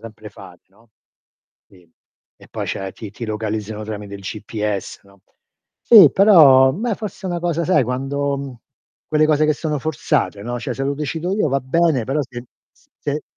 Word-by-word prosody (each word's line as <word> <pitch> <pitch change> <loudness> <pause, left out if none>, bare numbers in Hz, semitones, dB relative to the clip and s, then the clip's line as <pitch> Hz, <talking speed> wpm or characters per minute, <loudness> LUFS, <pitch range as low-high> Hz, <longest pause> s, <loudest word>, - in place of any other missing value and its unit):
sempre 110 -1 -11
fare, 90 -4 -15
no. 110 +4 -27 0.8
Sì. 90 -3 -22 0.5
E - - -18
poi - - -5
cioè, 95 -1 -5
ti 110 -3 -9
ti 115 +3 -8
localizzano 110 0 -4
tramite 105 -2 -7
il 100 - -9
GPS, 105 0 -5
no. 100 0 -22 0.6
Sì, 200 - +8
però, 145 -10 +6
beh, 220 - -2
forse 200 -2 -7
è 185 - -3
una 175 - -2
cosa 170 -1 -1
sai, 150 -7 +2
quando 140 +3 -2
mhmm, 135 -2 -7 0.5
quelle 155 0 +3
cose 155 0 +2
che 155 - +3
sono 150 -1 -3
forzate, 145 -8 -2
no, 120 +3 -4
cioè, 115 - -5
se 135 - -5
lo 140 - -1
decido 155 +5 -4
io 205 -7 +1
va 135 0 0
bene, 150 -1 +1
però 135 +6 -1
se 120 -2 -9 0.3
s - - -31
se 150 +1 -3
135 Hz, 185 wpm, -19 LUFS, 110-155 Hz, 0.8 s, Sì